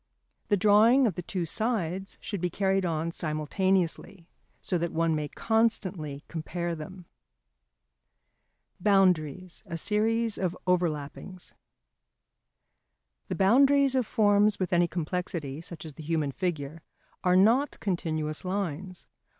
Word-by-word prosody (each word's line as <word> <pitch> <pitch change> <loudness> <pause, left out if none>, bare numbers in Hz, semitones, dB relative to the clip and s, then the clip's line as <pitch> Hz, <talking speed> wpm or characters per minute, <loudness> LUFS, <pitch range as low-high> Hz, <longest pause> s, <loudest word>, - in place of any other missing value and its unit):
The 205 - +2
drawing 215 +6 +5
of 215 - +1
the 180 - -5
two 175 0 -3
sides 195 -1 -2
should 200 -5 -5
be 180 - 0
carried 195 +1 0
on 165 0 -2
simultaneously, 170 +3 -1 0.3
so 180 - -1
that 170 0 -2
one 165 0 +1
may 150 -1 -2
constantly 190 -9 -1
compare 170 +1 -4
them. 170 +3 -9 1.7
[Sidenote: - - -17
Boundaries 185 -4 +2
a 170 - -4
series 220 +3 0
of 185 -1 -1
Overlappings.] 175 0 -2 1.7
The - - -3
boundaries 270 +7 +4
of 255 -4 +1
forms 205 -1 +3
with 185 -2 -1
any 175 0 +4
complexity, 165 -4 -4
such 165 -2 -9
as 155 - -8
the 155 - -10
human 155 -2 -1
figure, 160 -1 -4 0.4
are 180 0 +3
not 230 +10 +3
continuous 155 -5 -2
lines. 185 -1 -4
180 Hz, 125 wpm, -28 LUFS, 160-205 Hz, 1.7 s, drawing